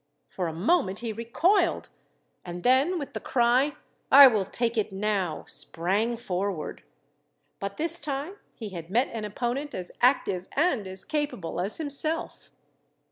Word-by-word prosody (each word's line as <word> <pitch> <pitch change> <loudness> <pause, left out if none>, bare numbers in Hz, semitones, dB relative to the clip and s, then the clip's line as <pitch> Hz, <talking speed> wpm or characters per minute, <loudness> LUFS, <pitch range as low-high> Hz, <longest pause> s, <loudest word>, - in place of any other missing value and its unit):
For 180 -2 -3
a - - -3
moment 195 - +1
he 230 -1 -3
recoiled, 335 - +1 0.5
and 175 0 -7
then 270 +9 +3
with 285 -4 -6
the - - -3
cry, 250 +4 +2 0.4
"I 280 +1 +11
will 215 -7 +4
take 235 +4 -1
it 215 -3 0
now," 195 -5 -1
sprang 200 +8 -1
forward. 190 -5 -3 0.8
But 200 0 -5
this 335 +2 +1
time 285 +7 -4 0.2
he 220 -3 -6
had 170 -3 -8
met 240 +7 +2
an 220 -2 -4
opponent 245 +7 -3
as 180 -1 -5
active 200 -8 +2
and 275 - +1
as 190 0 -4
capable 290 - -3
as 195 +4 -2
himself. 310 +2 -3
235 Hz, 145 wpm, -27 LUFS, 190-285 Hz, 0.8 s, I